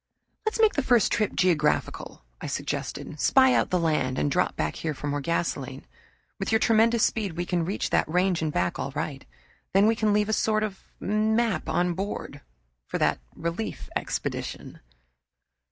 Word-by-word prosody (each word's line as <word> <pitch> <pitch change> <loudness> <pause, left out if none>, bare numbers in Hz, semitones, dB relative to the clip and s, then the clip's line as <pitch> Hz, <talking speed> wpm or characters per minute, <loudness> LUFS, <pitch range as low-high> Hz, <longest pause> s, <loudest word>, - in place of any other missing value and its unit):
"Let's 435 - -1
make 440 -1 +5
the 285 - +1
first 240 -5 +3
trip 215 -3 0
geographical," 150 - 0 0.2
I - - -4
suggested. 150 - -4
"Spy 260 - +5
out - - +2
the 180 - +2
land, 150 -6 0
and 75 -1 +1
drop - - +1
back 75 -1 -2
here 155 -2 -3
for 145 - -7
more 145 0 -1
gasoline. 170 +3 -2 0.5
With - - -2
your 220 - +5
tremendous 225 +1 +3
speed 205 -6 -1
we 175 +2 -3
can 175 -2 0
reach 195 +4 -2
that - - +2
range 180 +1 +2
and 155 -1 0
back 90 -9 -1
all - - -2
right. - - -3 0.5
Then 195 +2 +5
we 225 +1 +4
can 215 -1 +1
leave 210 0 +2
a - - +1
sort 215 0 +2
of 200 -3 -4 0.2
map 215 -2 +1
on 175 0 +1
board 195 +4 -5 0.5
for - - -2
that - - +1 0.2
relief 170 +7 -4
expedition." - - -4
190 Hz, 175 wpm, -26 LUFS, 165-220 Hz, 0.5 s, make